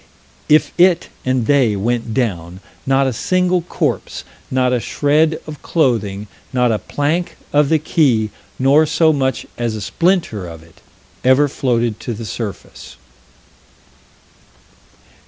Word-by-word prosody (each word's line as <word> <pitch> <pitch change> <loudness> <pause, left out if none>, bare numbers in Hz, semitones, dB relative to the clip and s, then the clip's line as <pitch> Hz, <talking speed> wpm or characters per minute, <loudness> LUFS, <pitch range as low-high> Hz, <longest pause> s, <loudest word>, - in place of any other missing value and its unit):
If 155 +1 +4
it 175 -1 +4 0.2
and 130 -2 +1
they 130 -5 +3
went 115 +3 -1
down 95 -8 -2 0.3
not 135 0 +3
a 130 - 0
single 180 +7 +1
corpse, 170 - -3 0.3
not 130 -1 +1
a 125 - +1
shred 155 +6 +1
of 150 -2 -9
clothing, 110 - 0 0.3
not 125 -2 +2
a 110 - 0
plank 155 +5 -2 0.2
of 145 -1 +3
the 160 - +4
quay, 130 -9 +1 0.3
nor 140 +4 +4
so 160 0 +3
much 130 -2 -1
as 120 -2 -1
a - - -5
splinter 165 - 0
of 80 -1 -10
it 85 - -21 0.4
ever 130 +3 +4
floated 120 -5 -1
to 120 - -5
the 115 +2 -7
surface. 105 0 -7
130 Hz, 135 wpm, -18 LUFS, 110-155 Hz, 0.4 s, If